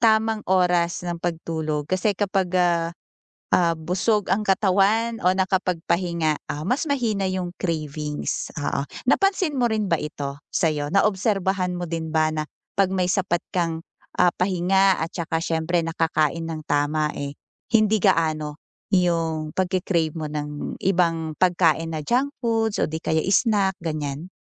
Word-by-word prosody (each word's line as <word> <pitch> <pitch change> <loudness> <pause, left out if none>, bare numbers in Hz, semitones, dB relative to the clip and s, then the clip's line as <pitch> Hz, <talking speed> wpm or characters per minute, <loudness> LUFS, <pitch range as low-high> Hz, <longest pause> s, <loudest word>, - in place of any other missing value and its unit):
tamang 220 -1 +3
oras 180 -2 +2
ng 175 -1 -4
pagtulog 160 -3 -2
kasi 185 +5 0
kapag, 190 -3 0
ah 170 -2 +2 0.7
ah, 170 -2 +3
busog 185 +6 0
ang 210 - -2
katawan 205 +3 +2
o 180 - +4
nakapagpahinga, 175 -3 0
ah, 150 +1 -4
mas 280 +5 0
mahina 230 -8 0
'yung 180 -1 -3
cravings, 150 -4 -3
oo. 145 -1 -1 0.2
Napansin 380 0 +2
mo 245 -3 +1
rin 215 -2 0
ba 170 - +2
ito, 145 -3 -5
sa'yo, 150 -3 0
naobserbahan 195 -1 +1
mo 175 - -3
din 160 -1 -4
ba 155 0 +2
na 155 - -1 0.3
'pag 195 -1 +2
may 185 -1 +1
sapat 180 -2 0
kang, 165 -3 0 0.4
ah, 180 -1 +4
pahinga 190 +1 +2
at 160 +1 -4
tsaka 165 -2 -1
siyempre 165 0 0
nakakain 160 -1 0
nang 155 -1 -6
tama, 150 +1 +1
eh, 140 0 -5 0.3
hindi 215 -3 +3
gaano 155 -2 +1 0.3
'yung 165 -4 +1
pagki-crave 175 -3 0
mo 155 - -3
ng 150 -1 -5
ibang 165 -4 +1
pagkain 165 -3 +2
na 155 - -3
junk 260 - 0
foods 225 -2 +1
o - - 0
di 160 - -3
kaya 160 -1 0
snack, 200 -3 +2
ganiyan? 155 0 -4
175 Hz, 145 wpm, -23 LUFS, 160-195 Hz, 0.7 s, o